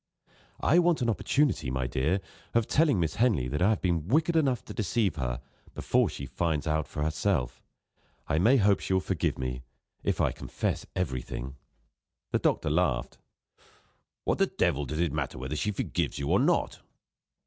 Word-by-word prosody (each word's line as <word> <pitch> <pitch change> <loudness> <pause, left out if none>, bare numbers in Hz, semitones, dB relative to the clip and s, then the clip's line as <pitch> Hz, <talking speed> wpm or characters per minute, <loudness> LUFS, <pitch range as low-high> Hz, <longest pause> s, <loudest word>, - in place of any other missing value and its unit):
"I 170 - +4
want 170 -6 +3
an 120 - +2
opportunity, 130 - +1
my 65 0 -1
dear, 70 +10 0 0.3
of 115 -2 +3
telling 145 - +3
Miss 80 -2 -1
Henley 105 - +2
that 75 +6 -2
I 95 - +5
have 110 - 0
been 85 -3 0
wicked 160 - +2
enough 135 -6 +2
to - - -8
deceive 105 0 0
her, - - -2 0.3
before - - +2
she 70 - -6
finds 80 +2 -1
it 80 - 0
out 80 0 0
for 75 - -3
herself. 75 -5 -1 0.7
I 80 - +1
may 120 +9 +5
hope 100 -3 +4
she - - -2
will 95 - +4
forgive 95 -3 -1
me, 65 -1 -3 0.4
if - - 0
I - - +2
confess - - -3
everything." 65 -5 -3 0.8
The - - +2
doctor 75 - +1
laughed: 80 -6 0 1.0
"What - - 0
the - - +4
devil 75 +1 0
does 75 - -4
it 85 -4 +1
matter 75 -4 -3
whether 65 +4 -4
she 105 - -1
forgives 105 - -2
you 70 0 -3
or - - +4
not?" - - +1
85 Hz, 180 wpm, -28 LUFS, 70-110 Hz, 1.0 s, I